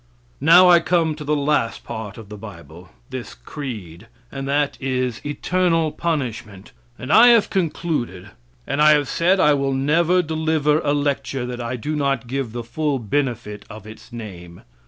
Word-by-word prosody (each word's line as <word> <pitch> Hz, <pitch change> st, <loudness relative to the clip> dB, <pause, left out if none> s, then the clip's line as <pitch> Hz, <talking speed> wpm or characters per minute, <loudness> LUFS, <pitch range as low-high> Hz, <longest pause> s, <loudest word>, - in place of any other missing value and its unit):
Now 170 Hz, +6 st, +7 dB
I 175 Hz, -1 st, +7 dB
come 165 Hz, -2 st, +1 dB
to 150 Hz, 0 st, -8 dB
the 150 Hz, +1 st, 0 dB
last 145 Hz, -5 st, 0 dB
part 110 Hz, -3 st, -7 dB
of 110 Hz, -3 st, -11 dB
the 105 Hz, -, -8 dB
bible 90 Hz, -4 st, -12 dB, 0.2 s
this -, -, -7 dB
creed 100 Hz, -, -8 dB, 0.2 s
and 135 Hz, 0 st, -5 dB
that 145 Hz, +1 st, 0 dB
is, 125 Hz, -3 st, -2 dB
eternal 165 Hz, +1 st, 0 dB
punishment, 120 Hz, -, -4 dB, 0.3 s
and 130 Hz, +4 st, -3 dB
I 235 Hz, +2 st, +8 dB
have 235 Hz, -3 st, +5 dB
concluded; 150 Hz, -, -2 dB, 0.3 s
and 145 Hz, -, -1 dB
I 155 Hz, 0 st, +7 dB
have 145 Hz, -2 st, +1 dB
said 180 Hz, +7 st, +2 dB
I 150 Hz, -4 st, +5 dB
will 140 Hz, -1 st, 0 dB
never 165 Hz, +7 st, +2 dB
deliver 155 Hz, -1 st, +1 dB
a 145 Hz, -2 st, 0 dB
lecture 140 Hz, -3 st, -1 dB
that 125 Hz, 0 st, -5 dB
I 120 Hz, +2 st, -3 dB
do 150 Hz, +6 st, -4 dB
not 140 Hz, -4 st, 0 dB
give 130 Hz, -1 st, -3 dB
the 120 Hz, +1 st, -5 dB
full 145 Hz, +4 st, -2 dB
benefit 120 Hz, -3 st, -3 dB
of 105 Hz, -1 st, -10 dB
its 110 Hz, +3 st, -13 dB
name. 90 Hz, -7 st, -10 dB
140 Hz, 170 wpm, -21 LUFS, 115-155 Hz, 0.3 s, I